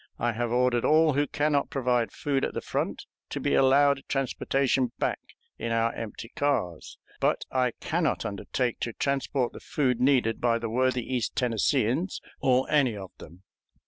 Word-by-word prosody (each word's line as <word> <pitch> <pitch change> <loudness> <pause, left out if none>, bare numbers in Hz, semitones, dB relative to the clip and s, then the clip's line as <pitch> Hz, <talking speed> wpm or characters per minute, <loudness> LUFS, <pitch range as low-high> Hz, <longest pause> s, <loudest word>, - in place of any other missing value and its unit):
I 120 0 0
have 120 +1 -2
ordered 125 -1 +2
all 155 0 +4
who 145 +2 +1
can 150 +1 0
not 140 -1 +1
provide 125 -5 0
food 140 -2 -1
at - - -2
the - - 0
front - - -3 0.2
to - - -4
be - - 0
allowed 140 +1 +4
transportation 135 -1 0
back - - -1 0.4
in 115 - -3
our 115 0 +1
empty 115 0 -7
cars; 115 - -1 0.2
but - - +1
I 125 -2 +1
can - - 0
not - - 0
undertake 120 +4 -2
to 115 - -3
transport 135 -1 -1
the - - -9
food 130 -5 0
needed 125 -4 +2
by 120 -1 +3
the 115 -1 -4
worthy 130 0 +1
East 125 -3 -2
Tennesseeans 125 - +1 0.2
or 130 0 +2
any 135 -8 +3
of 95 -2 -8
them. 90 +4 -13
125 Hz, 175 wpm, -27 LUFS, 115-140 Hz, 0.4 s, all